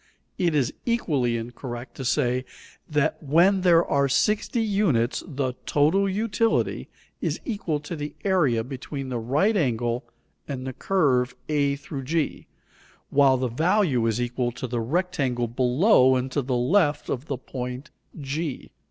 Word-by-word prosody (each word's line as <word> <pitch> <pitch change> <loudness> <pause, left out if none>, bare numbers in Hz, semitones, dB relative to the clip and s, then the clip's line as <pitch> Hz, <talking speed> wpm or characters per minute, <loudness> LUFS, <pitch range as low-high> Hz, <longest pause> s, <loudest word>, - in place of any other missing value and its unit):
It 170 -4 +2
is 135 -5 +1
equally 145 - 0
incorrect 120 +1 -7
to 135 - -5
say 125 -1 +1 0.5
that 150 -2 0
when 170 +6 +4
there 170 -2 +5
are 140 -1 +1
60 210 - +1
units 195 - +1
the 135 -5 -2
"total 170 +7 +3
utility" 220 +2 0 0.3
is - - -1
equal 200 - -2
to 150 +3 -6
the 150 -1 -6
area 150 - +2
between 135 +1 -6
the 125 -2 -2
right 145 - +1
angle 120 - 0 0.4
and 130 -3 -5
the 130 - -4
curve 130 -8 +1
a 145 -2 +1
g, 145 +2 -3 0.6
while 135 -2 +5
the 130 0 -1
value 155 - +2
is 115 +1 0
equal 120 0 -1
to 125 - -5
the 120 -1 -2
rectangle 135 -4 -1
below 130 - +4
and 130 +1 -2
to 145 - 0
the 125 -1 -1
left 150 +4 +2
of 135 +4 -3
the 140 - -2
point 125 +2 -6 0.3
g. 145 +1 -4
140 Hz, 145 wpm, -25 LUFS, 125-170 Hz, 0.6 s, there